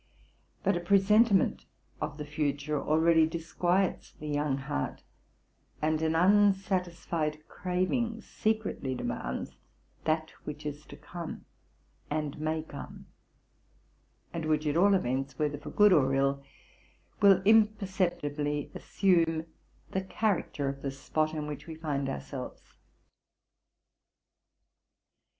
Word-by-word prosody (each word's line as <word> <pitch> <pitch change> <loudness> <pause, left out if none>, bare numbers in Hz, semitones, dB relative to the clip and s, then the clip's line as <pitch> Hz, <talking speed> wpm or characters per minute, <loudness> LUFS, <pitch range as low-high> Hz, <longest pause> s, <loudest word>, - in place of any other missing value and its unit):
But 195 -1 +3
a - - 0
presentiment 200 +3 +4 0.4
of 150 -1 -3
the 150 - -5
future 145 0 -1
already 160 +1 +4
disquiets 175 +3 -1
the 150 - -9
young 145 -2 0
heart; 130 - -3 0.8
and 155 0 +1
an 160 0 +1
unsatisfied 180 -5 +2
craving 205 +6 -1
secretly 215 -11 -2
demands 65 - -3 0.5
that 160 0 0
which 150 0 -7
is 150 0 -6
to - - -11
come 170 -2 -7 0.6
and 150 -1 -2
may 155 0 -1
come, 145 -3 -10 1.2
and 165 -1 -3
which 155 0 +1
at 150 0 +1
all 195 +4 +5
events, 135 -4 -1
whether 150 -2 -1
for - - -8
good 210 -2 +6
or 135 -4 +4
ill, 140 0 +1 0.8
will 195 -2 +6
imperceptibly 185 -9 +2
assume 165 -4 +1 0.5
the 190 - 0
character 190 -7 -1
of 140 0 -4
the 140 - -2
spot 155 +3 -1
in 150 -1 -3
which 150 0 -7
we 160 - -6
find 145 -4 -2
ourselves. 135 -1 -7
160 Hz, 115 wpm, -30 LUFS, 145-185 Hz, 1.2 s, good